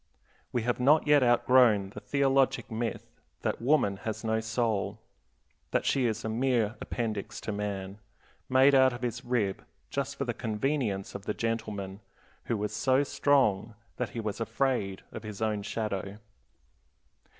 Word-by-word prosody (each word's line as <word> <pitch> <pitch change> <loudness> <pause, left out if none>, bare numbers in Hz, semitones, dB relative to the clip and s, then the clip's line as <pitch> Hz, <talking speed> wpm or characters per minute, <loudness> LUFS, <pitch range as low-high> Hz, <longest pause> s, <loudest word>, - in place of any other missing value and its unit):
We 120 - -1
have 120 +1 0
not 145 +5 +5
yet 145 -1 +5
outgrown 120 -5 +4
the - - -8
theologic 135 -2 +1
myth 115 +1 -4 0.2
that - - -1
woman 120 -7 +2
has 110 +3 -5
no 110 0 +1
soul, 110 -3 -1 0.7
that - - 0
she 130 -3 +2
is 110 -1 -3
a - - 0
mere 115 -1 +1
appendix 110 -4 -3
to - - -3
man, 100 -1 -4 0.5
made 130 +2 +6
out 130 -1 +6
of 120 0 -7
his 120 +1 -3
rib 120 -6 -1 0.3
just 140 0 -2
for 140 - -3
the 120 - -1
convenience 110 -2 -2
of 100 0 -7
the 105 - -2
gentleman 105 -4 -3 0.5
who 115 - -1
was 105 +1 -3
so 130 +5 +3
strong 120 -7 +2 0.2
that 125 -3 -2
he 115 - -6
was 110 0 -3
afraid 115 -6 -1
of - - -7
his 105 -2 -8
own 110 -2 0
shadow. 100 -2 -3
115 Hz, 155 wpm, -29 LUFS, 105-130 Hz, 0.7 s, made